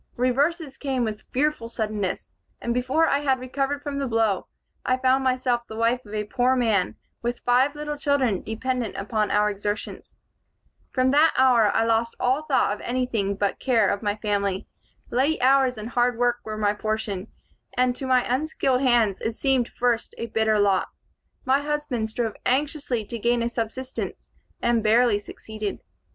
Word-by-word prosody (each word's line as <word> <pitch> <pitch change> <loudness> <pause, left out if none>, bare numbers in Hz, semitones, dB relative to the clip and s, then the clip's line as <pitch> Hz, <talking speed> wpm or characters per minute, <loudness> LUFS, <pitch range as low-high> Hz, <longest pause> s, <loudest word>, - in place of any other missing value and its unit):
Reverses 275 +4 0
came 265 -3 -1
with 215 -2 -4
fearful 275 -3 0
suddenness, 215 -4 -3 0.3
and 235 - -2
before 260 +6 +2
I 280 - +2
had 270 -3 +1
recovered 275 +3 -2
from 280 -1 -3
the 275 - -1
blow, 225 -5 +1 0.4
I 255 - +1
found 260 +1 +2
myself 255 -2 +1
the 220 - -8
wife 230 +3 +1
of 210 - -7
a 210 - -1
poor 250 +4 +1
man, 220 -7 +1 0.3
with 240 +1 -3
five 255 +4 +3
little 295 0 -4
children 280 - +1
dependent 240 0 -3
upon 210 +1 -1
our 210 0 +3
exertions. 205 0 -4 0.7
"From 255 0 +2
that 305 +3 +4
hour 245 -5 +5
I 225 - +2
lost 230 +1 +1
all 265 +5 +1
thought 265 -8 +2
of 210 - -8
anything 240 -6 -1
but 200 0 -1
care 230 -6 +3
of 200 - -1
my 205 -2 0
family. 200 -3 -1 0.4
Late 275 +6 +1
hours 260 -1 +4
and 215 +2 -6
hard 245 -1 +1
work 245 0 +2
were 215 -1 -5
my 205 -1 +2
portion, 210 -2 -3 0.5
and 250 0 +2
to 265 - -4
my 255 -1 +4
unskilled 265 -1 0
hands 235 -7 +3
it 225 - -2
seemed 265 -3 +1
first 240 -1 -1
a 230 - -3
bitter 220 -1 +1
lot. 200 -2 +2 0.6
My 270 +2 +3
husband 295 -6 -2
strove 225 -1 -2
anxiously 270 -4 0
to 230 +3 -5
gain 235 +1 +1
a 235 - 0
subsistence, 240 +3 -5 0.3
and 235 -1 +3
barely 225 0 +4
succeeded. 215 0 -6
240 Hz, 170 wpm, -24 LUFS, 215-260 Hz, 0.7 s, hour